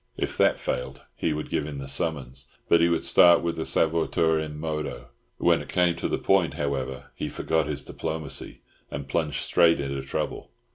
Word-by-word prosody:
If -, -, -2 dB
that -, -, +4 dB
failed 60 Hz, -, -4 dB
he 80 Hz, -, -1 dB
would 75 Hz, 0 st, -4 dB
give 75 Hz, -, -1 dB
him 75 Hz, -2 st, -6 dB
the 70 Hz, -1 st, -6 dB
summons; 70 Hz, -2 st, -3 dB, 0.2 s
but 85 Hz, -, +5 dB
he 85 Hz, -, +4 dB
would 85 Hz, -1 st, 0 dB
start 85 Hz, -1 st, +6 dB
with 85 Hz, -1 st, -1 dB
the 80 Hz, -, -3 dB
suaviter 80 Hz, 0 st, +2 dB
in 75 Hz, -1 st, -7 dB
modo. 75 Hz, -6 st, -4 dB, 0.3 s
When -, -, +3 dB
it -, -, -10 dB
came 90 Hz, -2 st, +2 dB
to -, -, -2 dB
the -, -, -1 dB
point, 95 Hz, -3 st, +2 dB
however, 70 Hz, -4 st, -3 dB
he -, -, -4 dB
forgot 80 Hz, -3 st, 0 dB
his 70 Hz, -2 st, -2 dB
diplomacy, 80 Hz, -3 st, -5 dB, 0.3 s
and 70 Hz, 0 st, -6 dB
plunged 75 Hz, +1 st, -1 dB
straight 85 Hz, -1 st, +4 dB
into 70 Hz, -1 st, -3 dB
trouble. 65 Hz, -, -4 dB
75 Hz, 190 wpm, -26 LUFS, 70-80 Hz, 0.3 s, start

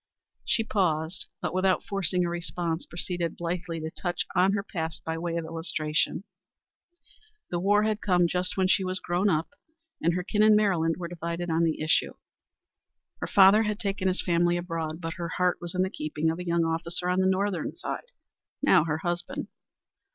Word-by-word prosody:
She 230 Hz, -1 st, +2 dB
paused, 170 Hz, -6 st, 0 dB, 0.2 s
but -, -, -1 dB
without 185 Hz, 0 st, +2 dB
forcing 180 Hz, -2 st, 0 dB
a -, -, 0 dB
response, 170 Hz, -1 st, -2 dB
proceeded 170 Hz, -1 st, -3 dB
blithely 170 Hz, -1 st, -3 dB
to 160 Hz, 0 st, -4 dB
touch 175 Hz, +1 st, -2 dB
on 185 Hz, +2 st, +4 dB
her 200 Hz, -1 st, 0 dB
past 160 Hz, -5 st, -4 dB
by 160 Hz, -, -3 dB
way 165 Hz, 0 st, -3 dB
of 165 Hz, -, -3 dB
illustration. 160 Hz, 0 st, -1 dB, 1.3 s
The 175 Hz, -, 0 dB
war 205 Hz, +3 st, +3 dB
had 215 Hz, 0 st, 0 dB
come 180 Hz, -3 st, +3 dB
just 180 Hz, +2 st, -1 dB
when 190 Hz, -1 st, +3 dB
she 190 Hz, +1 st, +3 dB
was 185 Hz, 0 st, -1 dB
grown 180 Hz, +3 st, +1 dB
up, 160 Hz, -2 st, 0 dB, 0.5 s
and 170 Hz, +1 st, +2 dB
her 180 Hz, -, -1 dB
kin 210 Hz, +3 st, 0 dB
in 215 Hz, 0 st, +7 dB
Maryland 175 Hz, -6 st, +2 dB
were 175 Hz, -1 st, -4 dB
divided 170 Hz, 0 st, -4 dB
on 160 Hz, +1 st, +2 dB
the 160 Hz, -, 0 dB
issue. 155 Hz, -, +2 dB, 1.1 s
Her -, -, -3 dB
father 200 Hz, +2 st, +7 dB
had 210 Hz, -1 st, -1 dB
taken 195 Hz, -1 st, -1 dB
his 185 Hz, 0 st, +1 dB
family 175 Hz, 0 st, +2 dB
abroad, 165 Hz, -2 st, -4 dB
but 165 Hz, 0 st, -3 dB
her 170 Hz, -1 st, -3 dB
heart 180 Hz, -1 st, +2 dB
was 175 Hz, +1 st, -5 dB
in 185 Hz, -, +3 dB
the 190 Hz, -, -1 dB
keeping 155 Hz, -1 st, -1 dB
of 165 Hz, -, -5 dB
a 180 Hz, -, -6 dB
young 170 Hz, -1 st, +2 dB
officer 170 Hz, +2 st, -1 dB
on 180 Hz, +1 st, +2 dB
the 190 Hz, -, +3 dB
Northern 190 Hz, -3 st, -1 dB
side -, -, -5 dB, 0.5 s
now -, -, +5 dB
her 155 Hz, -2 st, -1 dB
husband. 175 Hz, +2 st, -3 dB
175 Hz, 190 wpm, -27 LUFS, 165-190 Hz, 1.3 s, in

